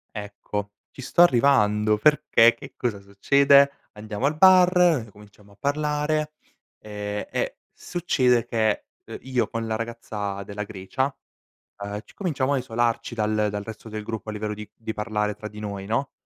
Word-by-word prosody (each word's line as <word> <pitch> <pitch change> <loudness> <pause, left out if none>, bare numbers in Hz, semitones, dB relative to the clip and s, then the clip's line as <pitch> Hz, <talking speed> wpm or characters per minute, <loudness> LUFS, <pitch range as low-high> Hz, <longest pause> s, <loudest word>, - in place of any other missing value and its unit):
Ecco, 105 0 -5 0.2
ci - - -10
sto 150 - +2
arrivando, 110 -8 +4
perché, 120 -2 +5
che 115 - -12
cosa 115 -5 -2
succede? 140 +8 +4 0.2
Andiamo 105 +3 -4
al 150 +2 +1
bar, 180 -7 +5
cominciamo 105 0 -18
a - - -21
parlare, 150 +3 -1 0.5
ehm, 105 -1 -5
e - - -2
succede 130 -9 +1
che, 110 -2 0 0.2
uhm, - - -8
io 125 -4 -1
con 115 +1 -4
la 110 - -1
ragazza 105 -4 -5
della 100 +1 -5
Grecia, 110 +8 -3 0.7
uhm, 100 0 -4
ci - - -19
cominciamo 145 -8 -1
a - - +2
isolarci 120 -1 -1
dal 105 -1 0
dal 105 0 -4
resto 110 +1 -9
del 110 0 -5
gruppo, 110 0 -6
a - - -2
livello 105 0 -3
di 105 0 -9
di 110 -1 -6
parlare 105 -1 -2
tra 110 - -8
di 105 - -11
noi, 100 -2 -5
no, 115 +7 -1
110 Hz, 160 wpm, -24 LUFS, 105-140 Hz, 0.7 s, perché